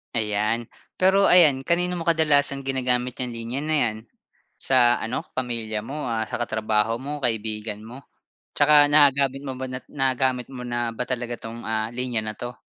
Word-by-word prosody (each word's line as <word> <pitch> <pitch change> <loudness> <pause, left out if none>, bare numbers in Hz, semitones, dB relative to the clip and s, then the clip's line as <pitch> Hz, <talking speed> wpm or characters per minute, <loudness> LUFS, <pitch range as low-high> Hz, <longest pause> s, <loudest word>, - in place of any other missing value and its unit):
Ayan. 110 +1 -1 0.3
Pero 190 +2 +3
ayan, 150 -7 +5
kanino 180 +1 0
mo 165 - -7
kadalasang 145 -4 +3
ginagamit 125 -2 -1
'yang 125 -1 -1
linya 115 +4 -4
na 155 0 0
'yan? 110 -7 +1 0.6
Sa 120 -2 +3
ano 115 +3 -3
pamilya 115 -4 -3
mo, 140 0 -5
ah, 110 -1 -1
sa - - -5
katrabaho 110 0 0
mo, 145 +2 -6
kaibigan 110 -2 -1
mo? 125 +4 -11 0.5
'Tsaka 145 0 +6
nagagamit 140 -2 +4
mo 135 -2 -5
ba 130 - -4
na 130 0 -5
nagagamit 130 -2 0
mo 130 -2 -8
na 120 -1 -3
ba 125 - -2
talaga 120 -1 -3
'tong, 115 +1 -9
ah, 110 0 -1
linya 120 -2 -2
na 110 - -4
'to? 120 0 -7
125 Hz, 170 wpm, -24 LUFS, 115-140 Hz, 0.6 s, Tsaka